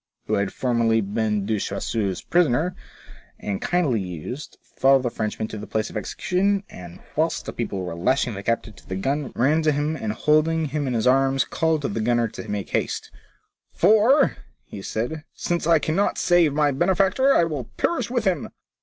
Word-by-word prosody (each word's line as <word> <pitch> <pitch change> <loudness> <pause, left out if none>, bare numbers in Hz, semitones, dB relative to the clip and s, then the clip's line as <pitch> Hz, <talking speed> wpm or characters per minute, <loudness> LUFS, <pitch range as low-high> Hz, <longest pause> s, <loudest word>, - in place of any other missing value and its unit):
— - - -52
who 110 - -2
had 100 -2 +1
formerly 115 -3 +1
been 105 0 -1
De 110 0 0
Choiseul's 100 -2 -2
prisoner, 175 +1 +2 0.6
and 100 -2 -4
kindly 150 - +1
used, 90 - -7
followed 135 0 +3
the 120 - -1
Frenchman 110 -1 -3
to 110 - -6
the 105 - -8
place 110 +1 -2
of - - -13
execution, 190 - 0
and, 90 -1 -11
whilst - - 0
the - - -5
people 95 -1 -3
were 90 - -4
lashing 125 +8 +1
the 100 - -6
captive 115 0 -2
to - - -18
the 95 - -3
gun, 135 +8 -2
ran 145 +7 +3
to 155 -1 +3
him, 150 +2 -1
and 110 -8 -3
holding 155 +5 +2
him 145 0 -2
in 125 - -1
his 110 - 0
arms, 135 +1 +3
called 160 -2 0
to - - +1
the 110 +2 -3
gunner 120 +1 +2
to 110 0 -9
make 100 -1 -4
haste; - - -2 0.3
'* - - -48
For," 220 - +4 0.4
said 110 +6 -3
he, 160 - -4
" - - -55
since 170 -2 -2
I 165 -1 +6
cannot 160 +6 0
save 175 -3 +4
my 150 -1 +3
benefactor, 190 - +3
I - - +5
will 150 -7 -3
perish 340 - 0
with 240 -3 -1
him." 180 -7 0
135 Hz, 200 wpm, -23 LUFS, 110-165 Hz, 0.6 s, I